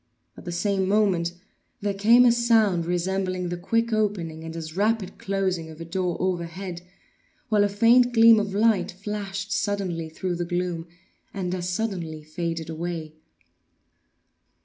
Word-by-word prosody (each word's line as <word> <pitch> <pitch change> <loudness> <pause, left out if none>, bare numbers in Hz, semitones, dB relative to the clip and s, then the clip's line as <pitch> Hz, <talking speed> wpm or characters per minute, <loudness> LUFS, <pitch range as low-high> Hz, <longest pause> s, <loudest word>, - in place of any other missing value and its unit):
At - - -13
the 175 - -4
same 190 +2 0
moment 190 -4 +2 0.5
there 200 0 0
came 230 +5 +6
a 240 - +7
sound 220 -7 +3
resembling 185 0 -1
the 175 - -2
quick 230 +6 0
opening, 185 -7 -1
and 165 0 -7
as 160 -1 -6
rapid 210 0 0
closing 190 -4 -1
of 160 0 -11
a 165 - -6
door 180 +1 -2
overhead, 180 0 -3 0.7
while 210 -2 +4
a 205 - +2
faint 235 +5 +5
gleam 230 -1 +7
of 205 -2 -3
light 210 -3 +3
flashed 200 +1 -5
suddenly 195 -6 -1
through 175 +2 -3
the 175 - -1
gloom, 175 -1 -2 0.5
and 180 -2 -2
as 180 -1 -3
suddenly 180 -6 -3
faded 165 +1 -4
away. 165 -1 -5
185 Hz, 150 wpm, -25 LUFS, 170-210 Hz, 0.7 s, a